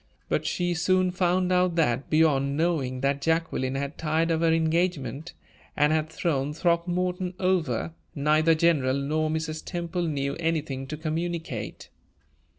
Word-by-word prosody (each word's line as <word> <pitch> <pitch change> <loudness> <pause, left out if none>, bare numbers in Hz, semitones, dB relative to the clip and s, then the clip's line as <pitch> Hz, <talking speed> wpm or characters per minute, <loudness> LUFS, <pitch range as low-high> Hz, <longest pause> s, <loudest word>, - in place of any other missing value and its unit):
But - - 0
she 175 -1 0
soon 185 +2 +2
found 180 0 +1
out 180 -1 +2
that, 135 -6 +1
beyond 145 -3 +3
knowing 145 -7 0
that 140 +1 0
Jacqueline 160 -4 0
had 140 +2 -4
tired 160 +1 +1
of 160 0 +1
her 165 -1 +3
engagement 165 -1 0 0.4
and 150 +1 +4
had 155 0 0
thrown 150 -3 -1
Throckmorton 180 +2 0
over, 180 -3 0 0.2
neither 155 +2 +3
General 155 -6 +2
nor 155 +3 0
Mrs. 155 0 -3
Temple 175 0 -3
knew 140 -2 -2
anything 155 -5 -2
to 155 - -5
communicate. 160 -5 -4
160 Hz, 140 wpm, -26 LUFS, 145-175 Hz, 0.4 s, and